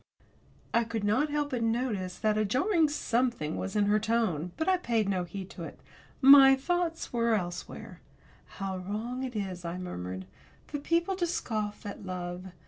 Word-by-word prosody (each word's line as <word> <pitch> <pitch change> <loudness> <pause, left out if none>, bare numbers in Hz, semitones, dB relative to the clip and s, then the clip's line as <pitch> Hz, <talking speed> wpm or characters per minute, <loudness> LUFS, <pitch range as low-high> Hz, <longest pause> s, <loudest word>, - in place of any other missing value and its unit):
I 235 - +4
could 225 -2 -4
not 255 +9 +2
help 295 0 -1
but 245 -2 -1
notice 225 -6 -1
that 215 +1 +1
a 215 - +2
jarring 310 - +2
something 240 - 0
was 195 - -4
in 205 -1 +3
her 210 +1 +3
tone. 215 -7 0
But 320 - -1
I 375 -1 +4
paid 230 - 0
no 185 -2 0
heed 190 +2 -7
to 175 - -8
it. - - -9 0.4
My 270 0 +9
thoughts 335 +3 -2
were 235 -1 +2
elsewhere. 175 -3 -5 0.6
"How 195 -2 -3
wrong 220 +7 -4
it 255 -3 -4
is," 190 -4 -4
I 170 +1 -4
murmured, 95 - -5 0.4
"for 290 - -5
people 335 +6 +1
to 350 -2 +1
scoff 215 -10 -3
at 205 0 -6
love. 180 -1 -5
220 Hz, 175 wpm, -29 LUFS, 185-265 Hz, 0.6 s, My